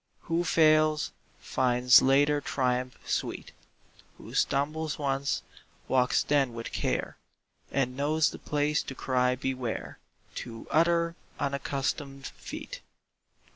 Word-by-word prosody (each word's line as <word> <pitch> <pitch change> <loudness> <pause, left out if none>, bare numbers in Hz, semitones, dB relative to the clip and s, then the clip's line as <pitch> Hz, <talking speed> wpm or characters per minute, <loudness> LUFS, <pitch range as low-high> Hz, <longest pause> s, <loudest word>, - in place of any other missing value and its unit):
Who 165 +1 0
fails, 155 -2 +3 0.3
finds 125 -1 +4
later 145 +2 +3
triumph 125 -2 -1
sweet; - - -2 0.7
Who - - -11
stumbles 155 +2 0
once, 140 -1 -1 0.4
walks 130 0 +3
then 135 -5 +1
with 115 0 -6
care, - - -2 0.5
And 125 -2 0
knows 150 +3 +2
the - - -9
place 150 0 0
to 135 - -7
cry 125 -1 +1
"Beware" 130 -2 -4 0.4
To 115 -1 -7
other 170 +1 +3 0.3
unaccustomed 140 0 -2
feet. - - -8
140 Hz, 105 wpm, -29 LUFS, 130-155 Hz, 0.7 s, finds